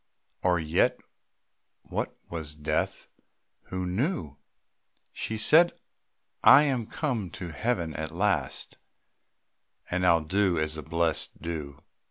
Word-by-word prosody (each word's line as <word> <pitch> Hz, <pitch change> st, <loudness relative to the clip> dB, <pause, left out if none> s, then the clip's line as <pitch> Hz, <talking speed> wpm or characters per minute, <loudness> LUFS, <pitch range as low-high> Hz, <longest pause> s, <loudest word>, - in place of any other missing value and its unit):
Or 90 Hz, -1 st, +3 dB
yet 80 Hz, -1 st, +1 dB, 0.8 s
what -, -, -4 dB
was 80 Hz, -3 st, -4 dB
death 75 Hz, 0 st, -2 dB, 0.6 s
who 95 Hz, 0 st, -4 dB
knew? 90 Hz, -, -2 dB, 0.8 s
She 110 Hz, -, -3 dB
said: 160 Hz, +10 st, +5 dB, 0.7 s
"I 145 Hz, -, +9 dB
am 130 Hz, -6 st, 0 dB
come 120 Hz, -, -2 dB
to 90 Hz, -2 st, -6 dB
Heaven 85 Hz, -2 st, -1 dB
at 80 Hz, +1 st, -4 dB
last, 85 Hz, -6 st, -1 dB, 1.1 s
And 90 Hz, +1 st, 0 dB
I 90 Hz, -, +5 dB
'll 85 Hz, -, +2 dB
do 95 Hz, +2 st, +1 dB
as 80 Hz, 0 st, 0 dB
the 80 Hz, -, -5 dB
blessed 80 Hz, +2 st, 0 dB
do." 75 Hz, -5 st, -5 dB
85 Hz, 120 wpm, -28 LUFS, 80-105 Hz, 1.1 s, I